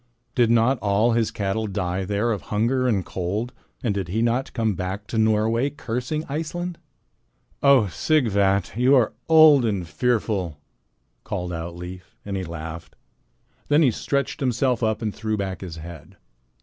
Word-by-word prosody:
Did 120 -3 +3
not 120 +2 +3
all 105 +3 +2
his 115 -1 +1
cattle 105 +2 -2
die 95 -2 -2
there 105 +4 0
of 105 - -2
hunger 120 +5 +1
and 100 -7 +1
cold, 100 +7 -3 0.3
and 115 -5 +1
did 100 -3 -3
he 110 +6 0
not 120 +3 0
come 110 -3 0
back 95 +3 -4
to 110 - -2
Norway 110 +4 +2
cursing 130 +3 -4
Iceland?" 165 +4 -4 0.8
"Oh, 140 -5 +6
Sighvat, 100 - +1
you 125 +4 +4
are 120 -5 +3 0.2
old 155 -4 +7
and 100 -6 -1
fearful," 95 -2 -1 0.7
called 90 0 -4
out 85 +1 -5
Leif, 90 +1 -9
and 100 -1 -4
he 95 - -2
laughed. 80 -1 -7 0.7
Then 150 +2 +4
he 130 - +4
stretched 140 +5 -2
himself 125 -2 +1
up 110 0 0
and 105 -2 -2
threw 110 -1 -2
back 95 -2 -4
his 90 -4 -7
head. 80 -2 -11
110 Hz, 160 wpm, -23 LUFS, 95-125 Hz, 0.8 s, old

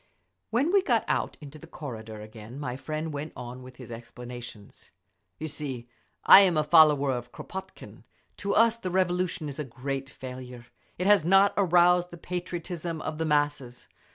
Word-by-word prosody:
When 265 +9 +1
we 395 0 +5
got 375 - +1
out - - -1
into 150 +1 -11
the 165 - -13
corridor 110 -9 -8
again 110 +4 -10
my 125 -4 -4
friend 155 +3 -4
went 145 +2 -5
on 125 +1 -8
with 130 0 -12
his 120 - -11
explanations. 120 -2 -10 0.5
"You 155 - -5
see, 135 -5 -5 0.4
I'm 190 -4 +8
a 155 - +3
follower 150 -3 +5
of 120 -1 -4
Kropotkin. 190 0 -9 0.3
To 200 0 -2
us 230 +1 +4
the 185 -5 -4
Revolution 180 -2 0
is 145 +1 -7
a - - -1
great 135 +1 -5
failure; 125 -3 -9 0.3
it 180 - -2
has 205 -4 +5
not 195 +4 +5
aroused 180 -1 +4
the 175 - -10
patriotism 175 -1 -5
of 155 0 -4
the 160 - 0
masses. 145 -5 -1
150 Hz, 165 wpm, -27 LUFS, 125-180 Hz, 0.5 s, I'm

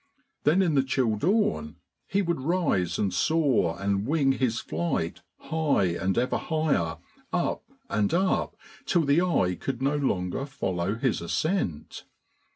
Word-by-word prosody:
Then 170 +6 +4
in 170 -4 +1
the 135 - +4
chill 130 -4 0
dawn 105 - 0 0.3
he 200 +1 +1
would 170 -5 -1
rise 145 - 0
and 100 -3 0
soar 130 - +2
and 100 +2 0
wing 145 -2 +3
his 125 -3 0
flight 160 - -2 0.2
high 150 - +1
and 95 +1 -1
ever 125 +1 +1
higher, 155 - 0 0.3
up - - -1 0.2
and 105 -1 0
up, 185 +2 +1 0.3
till 175 -3 +3
the 145 +3 +3
eye 130 - +2
could 125 +7 -4
no 140 +3 +1
longer 130 -2 -1
follow 95 -8 -2
his 125 -3 0
ascent. 120 - -2
135 Hz, 145 wpm, -27 LUFS, 95-160 Hz, 0.3 s, Then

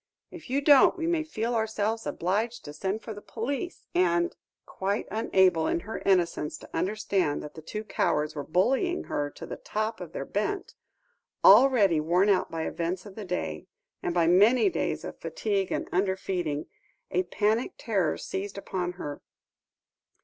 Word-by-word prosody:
If 335 -6 -11
you 275 +2 +1
don't, 285 +3 +6
we 330 - -2
may 335 -1 +1
feel 240 -6 -2
ourselves 220 0 -1
obliged 215 +7 -1
to 145 - -7
send 195 +7 -3
for 220 - -6
the 205 - -10
police 280 - -4
and 175 -1 +2 0.2
" - - -65
Quite 200 +2 -2
unable, 190 -7 +3
in 170 - 0
her 220 +5 -6
innocence, 170 -5 +2
to - - -13
understand 190 -3 0
that 150 - -8
the 160 - -10
two 210 +7 -5
cowards 150 -7 0
were 145 - -4
bullying 265 - +1
her 145 0 -2
to - - -10
the - - -6
top 215 0 -3
of 175 - -7
their 135 - -4
bent; 215 - -2 0.7
already 210 - +7
worn 175 +6 +2
out 195 - +2
by 165 -1 -3
the - - -1
events 175 +3 -3
of 205 - -10
the 210 0 -7
day, 80 - -3 0.3
and - - -1
by 170 -1 +4
many 210 - +5
days - - -2
of - - -8
fatigue 200 -3 -1
and - - -2
under 190 +1 +1
feeding, 175 -6 -2 0.5
a 180 - +2
panic 210 +6 0
terror 205 -6 0
seized 200 +1 -5
upon 180 -2 -3
her. 145 -5 -6
195 Hz, 175 wpm, -28 LUFS, 175-220 Hz, 0.7 s, already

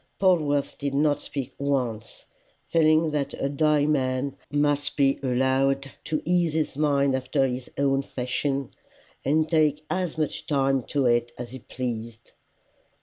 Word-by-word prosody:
Polwarth 150 -7 +2
did 140 -1 -2
not 145 0 +2
speak 135 -2 -6
once, 125 -6 -2 0.4
feeling 155 -1 +3
that 145 -2 -2
a - - -1
dying 150 +1 +2
man 130 -1 0
must 145 0 0
be 135 -1 +3
allowed 135 +1 +1
to 155 -1 -2
ease 175 -2 +2
his 155 -3 -1
mind 140 -2 +2
after 130 +1 +1
his 125 -1 -4
own 135 -1 +2
fashion, 135 +1 -2 0.5
and 155 +3 +2
take 155 -2 +2
as 180 -4 -1
much 155 -2 -2
time 135 -2 +2
to 140 +2 -1
it 120 0 +2
as 120 -1 -7
he 130 - -8
pleased. 115 -2 -6
140 Hz, 145 wpm, -25 LUFS, 130-150 Hz, 0.5 s, feeling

